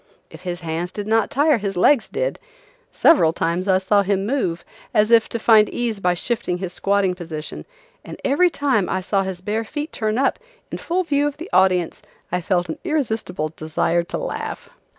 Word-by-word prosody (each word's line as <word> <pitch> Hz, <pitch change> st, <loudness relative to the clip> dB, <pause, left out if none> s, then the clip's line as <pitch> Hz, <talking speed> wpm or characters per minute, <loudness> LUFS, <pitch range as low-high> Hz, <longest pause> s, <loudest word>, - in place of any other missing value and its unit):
If -, -, -12 dB
his 180 Hz, -1 st, -5 dB
hands 165 Hz, +2 st, -3 dB
did 205 Hz, +1 st, -5 dB
not 220 Hz, 0 st, +2 dB
tire 290 Hz, -1 st, +3 dB
his 195 Hz, -2 st, -3 dB
legs 245 Hz, +7 st, +4 dB
did. -, -, -2 dB, 0.5 s
Several 165 Hz, -, +5 dB
times 170 Hz, +3 st, -1 dB
I 190 Hz, -1 st, +4 dB
saw 200 Hz, +2 st, +2 dB
him 195 Hz, 0 st, 0 dB
move, 205 Hz, -9 st, -1 dB, 0.3 s
as 210 Hz, +2 st, +3 dB
if 230 Hz, -1 st, +5 dB
to -, -, -3 dB
find 220 Hz, -2 st, +5 dB
ease 235 Hz, -4 st, -2 dB
by 180 Hz, -2 st, +1 dB
shifting 220 Hz, -2 st, -2 dB
his 180 Hz, -1 st, -5 dB
squatting 195 Hz, -1 st, +1 dB
position, 160 Hz, -4 st, -7 dB, 0.4 s
and -, -, -9 dB
every 320 Hz, +7 st, +4 dB
time 265 Hz, -, 0 dB
I 190 Hz, -, 0 dB
saw 195 Hz, +1 st, 0 dB
his 190 Hz, -2 st, -5 dB
bare 215 Hz, +4 st, -2 dB
feet 295 Hz, +6 st, -5 dB
turn 215 Hz, 0 st, -1 dB
up, 270 Hz, 0 st, +1 dB, 0.3 s
in -, -, -4 dB
full 365 Hz, +2 st, -1 dB
view 290 Hz, -3 st, +1 dB
of 290 Hz, -, -5 dB
the 335 Hz, +5 st, -9 dB
audience, 185 Hz, -2 st, +2 dB, 0.3 s
I 180 Hz, +1 st, 0 dB
felt 175 Hz, 0 st, 0 dB
an 160 Hz, -, -5 dB
irresistible 225 Hz, -, -2 dB
desire 160 Hz, +2 st, 0 dB
to -, -, -4 dB
laugh. -, -, -5 dB
200 Hz, 190 wpm, -21 LUFS, 180-255 Hz, 0.5 s, Several